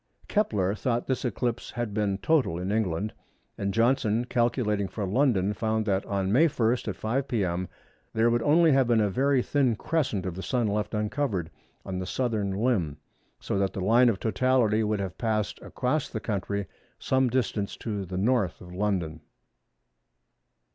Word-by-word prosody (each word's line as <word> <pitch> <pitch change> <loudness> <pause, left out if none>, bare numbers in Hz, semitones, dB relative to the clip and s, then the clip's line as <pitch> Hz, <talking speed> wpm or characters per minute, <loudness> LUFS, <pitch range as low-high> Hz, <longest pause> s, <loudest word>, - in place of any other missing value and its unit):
Kepler 105 - +1
thought 120 +2 -1
this 130 - -1
eclipse 120 -1 -2
had 120 -4 -4
been 100 -2 0
total 135 - +1
in 90 +3 -3
England, 105 -1 -1 0.4
and 100 0 -2
Johnson 115 0 +2
calculating 115 -5 0
for 105 +1 -4
London 105 -2 +2
found 110 +1 -1
that 100 -2 +1
on 100 -1 -1
May 150 +10 +5
1, 115 -6 +1 0.2
at 100 - -2
5 130 +8 -1
p.m., 90 -5 -1 0.4
there 115 +1 +2
would 120 0 +2
only 160 +5 +5
have 135 -2 +4
been 120 -2 +3
a 105 -2 +2
very 135 +4 +2
thin 135 -5 +2
crescent 125 - -1
of 95 - -3
the 95 - -6
Sun 120 +2 0
left 105 -1 -2
uncovered 105 - -1 0.3
on 95 -1 -3
the 95 - -4
southern 110 -4 -1
limb, 95 - 0 0.4
so 100 - -2
that 95 -1 0
the - - -4
line 115 +6 +5
of 100 -4 -1
totality 115 -2 +2
would 105 -1 0
have 95 -2 -5
passed 110 -3 -1
across 135 +4 -1
the 110 - -4
country 100 -2 -2 0.3
some 130 -1 +1
distance 115 -5 -1
to 105 -4 -3
the 95 0 -6
N. 100 +4 +1
of 95 -7 0
London. 90 -5 -1
110 Hz, 170 wpm, -27 LUFS, 100-125 Hz, 0.4 s, May